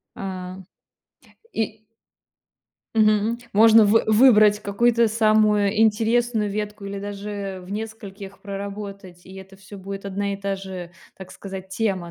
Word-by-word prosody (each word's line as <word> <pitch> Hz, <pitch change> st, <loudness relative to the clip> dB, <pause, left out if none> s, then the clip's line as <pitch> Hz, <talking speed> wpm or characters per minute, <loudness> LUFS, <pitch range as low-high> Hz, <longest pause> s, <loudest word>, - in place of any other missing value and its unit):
А 185 Hz, -1 st, -6 dB, 1.0 s
и 220 Hz, 0 st, -3 dB, 1.1 s
Мгм. 215 Hz, +1 st, +2 dB, 0.2 s
Можно 220 Hz, +1 st, +7 dB
вы 220 Hz, +2 st, +3 dB
выбрать 215 Hz, -2 st, +5 dB
какую-то 230 Hz, +3 st, +2 dB
самую 215 Hz, -1 st, +2 dB
интересную 225 Hz, 0 st, +2 dB
ветку 210 Hz, 0 st, -5 dB
или 200 Hz, 0 st, -5 dB
даже 200 Hz, -1 st, -6 dB
в 180 Hz, -, -13 dB
нескольких 205 Hz, -2 st, -8 dB
проработать, 200 Hz, -2 st, -8 dB
и 190 Hz, -, -13 dB
это 190 Hz, 0 st, -12 dB
всё 195 Hz, +1 st, -12 dB
будет 195 Hz, +1 st, -7 dB
одна 200 Hz, +1 st, -3 dB
и -, -, -6 dB
та 195 Hz, 0 st, -3 dB
же, 190 Hz, -3 st, -8 dB, 0.3 s
так 190 Hz, -1 st, -11 dB
сказать, 190 Hz, -1 st, -9 dB
тема, 190 Hz, -4 st, -2 dB
205 Hz, 130 wpm, -23 LUFS, 195-215 Hz, 1.1 s, Можно